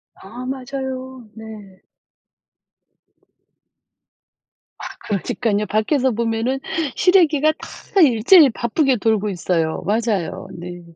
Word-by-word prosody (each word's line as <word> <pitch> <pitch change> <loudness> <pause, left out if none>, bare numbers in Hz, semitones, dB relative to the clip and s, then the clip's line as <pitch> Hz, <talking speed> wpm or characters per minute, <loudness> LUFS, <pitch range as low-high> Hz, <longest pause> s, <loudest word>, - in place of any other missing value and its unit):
아. 235 +6 -10
맞아요. 260 -1 -6
네. 210 -4 -12 3.0
아 - - -10 0.2
그러니깐요. 210 +2 -1
밖에서 255 +5 +1
보면은 230 +3 -1 0.4
실외기가 315 -5 +3
다 395 - -3
일제히 275 - +6
바쁘게 250 +4 0
돌고 215 -1 0
있어요. 170 -3 -1
맞아요, 205 -4 -2
네. 175 +1 -8
230 Hz, 205 characters per minute, -20 LUFS, 205-265 Hz, 3.0 s, 일제히